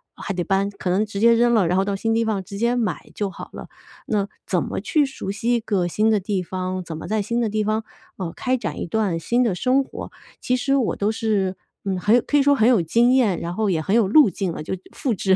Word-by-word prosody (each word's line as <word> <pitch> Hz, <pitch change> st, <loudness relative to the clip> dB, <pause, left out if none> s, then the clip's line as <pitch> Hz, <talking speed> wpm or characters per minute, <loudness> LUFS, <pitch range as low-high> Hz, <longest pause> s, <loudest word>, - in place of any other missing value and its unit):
还 200 Hz, -, -5 dB
得 180 Hz, -1 st, -2 dB
搬， 195 Hz, +2 st, +1 dB
可 200 Hz, -2 st, -5 dB
能 195 Hz, +4 st, +2 dB
直 205 Hz, -2 st, -6 dB
接 230 Hz, +2 st, +6 dB
扔 240 Hz, +1 st, +3 dB
了， 205 Hz, -7 st, +3 dB
然 180 Hz, +2 st, +1 dB
后 190 Hz, -, +2 dB
到 200 Hz, 0 st, -1 dB
新 225 Hz, +3 st, -1 dB
地 230 Hz, 0 st, +1 dB
方 210 Hz, -3 st, -1 dB
直 200 Hz, +2 st, -8 dB
接 235 Hz, +3 st, +1 dB
买 235 Hz, -3 st, -2 dB
就 205 Hz, -2 st, -2 dB
好 190 Hz, -, -9 dB
了。 -, -, -8 dB, 0.4 s
那 205 Hz, -2 st, 0 dB, 0.2 s
怎 -, -, +1 dB
么 -, -, -4 dB
去 305 Hz, -3 st, +2 dB
熟 265 Hz, -8 st, -5 dB
悉 225 Hz, +4 st, -1 dB
一 -, -, +1 dB
个 200 Hz, -5 st, -1 dB
新 215 Hz, +5 st, +1 dB
的 215 Hz, -2 st, +3 dB
地 195 Hz, 0 st, -2 dB
方， 185 Hz, +1 st, -4 dB
怎 160 Hz, -2 st, -7 dB
么 -, -, -7 dB
在 215 Hz, 0 st, 0 dB
新 235 Hz, +4 st, -1 dB
的 230 Hz, -2 st, 0 dB
地 215 Hz, 0 st, 0 dB
方， 215 Hz, +1 st, 0 dB, 0.3 s
呃， 175 Hz, -4 st, -4 dB
开 255 Hz, 0 st, 0 dB
展 170 Hz, -10 st, -5 dB
一 -, -, -3 dB
段 195 Hz, -3 st, 0 dB
新 240 Hz, +10 st, +1 dB
的 225 Hz, -, +1 dB
生 260 Hz, +7 st, +2 dB
活， -, -, -8 dB, 0.3 s
其 250 Hz, -, +1 dB
实 275 Hz, +2 st, +1 dB
我 260 Hz, -6 st, +1 dB
都 205 Hz, +2 st, 0 dB
是， 205 Hz, -4 st, 0 dB, 0.3 s
嗯， 190 Hz, -2 st, -1 dB
很 210 Hz, +5 st, +4 dB
有 245 Hz, -, +4 dB
可 -, -, 0 dB
以 -, -, +5 dB
说 285 Hz, 0 st, +4 dB
很 220 Hz, -2 st, +3 dB
有 235 Hz, -8 st, +5 dB
经 235 Hz, +9 st, +3 dB
验， 230 Hz, -9 st, +3 dB
然 170 Hz, +1 st, -4 dB
后 215 Hz, -2 st, 0 dB
也 170 Hz, -4 st, +1 dB
很 195 Hz, +6 st, 0 dB
有 230 Hz, -4 st, +4 dB
路 285 Hz, +7 st, +6 dB
径 185 Hz, +1 st, -3 dB
了。 155 Hz, -, -6 dB
就 155 Hz, -, -4 dB, 0.2 s
复 265 Hz, -6 st, -2 dB
制 190 Hz, -1 st, +2 dB
210 Hz, 295 characters per minute, -22 LUFS, 190-235 Hz, 0.4 s, 接